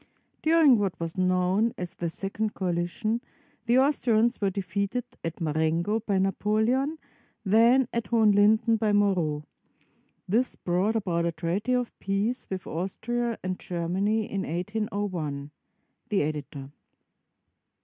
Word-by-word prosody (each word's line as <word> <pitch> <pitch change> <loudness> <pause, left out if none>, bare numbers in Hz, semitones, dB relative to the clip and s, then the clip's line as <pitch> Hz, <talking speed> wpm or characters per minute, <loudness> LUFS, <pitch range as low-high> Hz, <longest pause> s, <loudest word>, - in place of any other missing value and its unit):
During 310 -7 +5
what 195 -4 -1
was 165 -1 -4
known 185 +4 +2
as 180 0 -5
the 170 -2 -3
Second 205 +5 -3
Coalition, 180 +5 -1 0.5
the 240 +2 +4
Aus 280 +3 +3
trians 235 0 +2
were 200 - +2
defeated 200 +5 -2 0.2
at 165 +2 -4
Marengo 165 +6 0
by 205 -3 -1
Napoleon, 220 - +1 0.5
then 230 +5 +5
at 235 -3 -2
Ho 230 -1 +3
henlinden 215 +2 +4
by 215 -2 +1
Moreau. 180 -8 +1 0.8
This 235 +7 +1
brought 185 +5 0
about 170 -6 0
a - - 0
treaty 170 +9 -1
of 245 -1 0
peace 200 +6 -1
with 190 -2 -4
Austria 230 +7 -2
and 185 0 -3
Germany 190 +5 -1
in 195 -2 -3
1801. 180 -6 -3 0.6
The 205 -6 +2
Editor. 145 -2 -5
200 Hz, 130 wpm, -27 LUFS, 175-225 Hz, 0.8 s, During